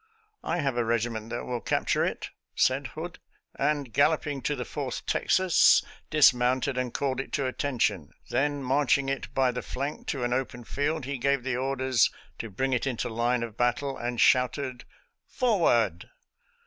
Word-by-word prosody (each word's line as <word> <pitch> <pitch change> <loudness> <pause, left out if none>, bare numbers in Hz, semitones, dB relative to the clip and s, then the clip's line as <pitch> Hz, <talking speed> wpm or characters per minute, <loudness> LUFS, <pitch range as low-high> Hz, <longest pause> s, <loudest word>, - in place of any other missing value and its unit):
" 430 0 -47
I 175 - 0
have 135 -4 -1
a 120 - +2
regiment 115 -1 -1
that 120 +1 -4
will 120 -2 -3
capture - - +1
it," - - -3 0.2
said - - +2
Hood; - - -6 0.3
and, 145 -6 -1
galloping 145 +1 +2
to 145 - -1
the 125 -2 -4
Fourth 140 -4 -5
Texas, 185 -2 +4 0.3
dismounted 130 -2 +4
and 125 -1 -2
called 135 0 -1
it 135 - -5
to 140 - 0
atten 130 +1 -2
tion. 95 -10 0 0.2
Then 140 +2 0
marching 135 +1 +2
it 135 -1 -3
by 130 -2 +3
the 125 0 -4
flank 140 +3 -5
to 135 -4 -2
an 120 0 0
open 125 -1 -3
field, 145 +5 -2
he 140 -1 -4
gave 140 0 +1
the 130 -1 -1
orders 130 -1 +2 0.3
to 115 - -5
bring 130 +7 -1
it 125 +2 0
into 125 -2 -2
line 120 +1 0
of 115 -1 -7
battle, 125 +3 0
and 120 0 -4
shouted, 130 0 +2 0.2
" - - -54
Forward 120 - +2
130 Hz, 175 wpm, -27 LUFS, 120-140 Hz, 0.3 s, Texas